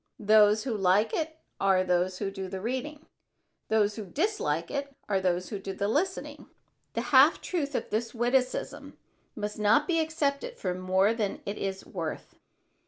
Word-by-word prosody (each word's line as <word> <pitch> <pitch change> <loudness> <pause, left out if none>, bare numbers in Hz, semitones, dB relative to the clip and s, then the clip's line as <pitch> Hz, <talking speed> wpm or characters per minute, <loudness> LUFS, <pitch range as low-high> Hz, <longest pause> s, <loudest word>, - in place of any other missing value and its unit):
Those 215 0 +5
who 240 -3 -2
like 200 +2 +2
it 315 0 -2 0.2
are 190 -1 +3
those 180 0 +1
who 195 -1 -3
do 195 -1 -5
the 190 0 -5
reading; 260 +8 -4 0.6
those 210 -1 +2
who 215 - -5
dislike 180 - -1
it 280 -1 -4
are 195 -2 +1
those 180 -1 0
who 205 - -4
do 195 0 -5
the 200 +1 -1
listening." 345 - -2 0.5
The - - -1
half - - +7
truth 295 -6 -3
in - - -1
this 225 +2 -1
witticism 250 +2 -1 0.4
must 210 -1 -4
not 215 +8 +4
be 330 -2 +2
accepted 320 - -1
for 180 - -2
more 185 +3 +2
than 210 -4 -3
it 200 +1 -4
is 195 -1 -4
worth. 165 -4 -5
210 Hz, 170 wpm, -28 LUFS, 190-280 Hz, 0.6 s, half